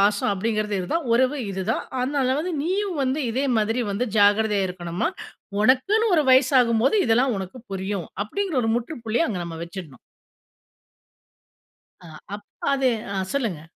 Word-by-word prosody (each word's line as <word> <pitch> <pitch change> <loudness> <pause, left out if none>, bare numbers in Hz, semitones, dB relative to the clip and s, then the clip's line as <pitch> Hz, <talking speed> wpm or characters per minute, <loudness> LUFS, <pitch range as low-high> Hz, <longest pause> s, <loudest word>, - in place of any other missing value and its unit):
பாசம் 205 +1 +2
அப்படிங்கிறது 210 +1 -1
இது 180 - -4
தான் 330 -4 0
உறவு 260 +4 +3
இது 190 0 -3
தான். - - 0 0.2
அதனால 260 0 +1
வந்து 350 +4 -2
நீயும் 380 +2 -1
வந்து 265 +2 0
இதே 260 +5 -1
மாதிரி 225 +3 +1
வந்து 200 +5 -1
ஜாக்கிரதையா 205 0 +4
இருக்கணும்மா. 180 - -3 0.5
உனக்குன்னு 270 - +3
ஒரு 315 - +4
வயசு 260 +1 +5
ஆகும்போது 235 - +2
இதெல்லாம் 245 +2 +3
உனக்கு 190 +6 -7
புரியும். 190 -2 -3 0.2
அப்படிங்கிற 370 - -2
ஒரு 225 - +1
முற்றுப்புள்ளிய 240 +2 -1
அங்க 200 - -3
நம்ம 165 -1 -7
வச்சிடனும். 170 -5 -8 2.0
அ, 180 - -14 0.3
அப்ப 205 0 -9 0.3
அது 270 -1 +2 0.2
அ - - -4 0.2
சொல்லுங்க. 225 - -2
230 Hz, 150 wpm, -24 LUFS, 200-270 Hz, 2.0 s, வயசு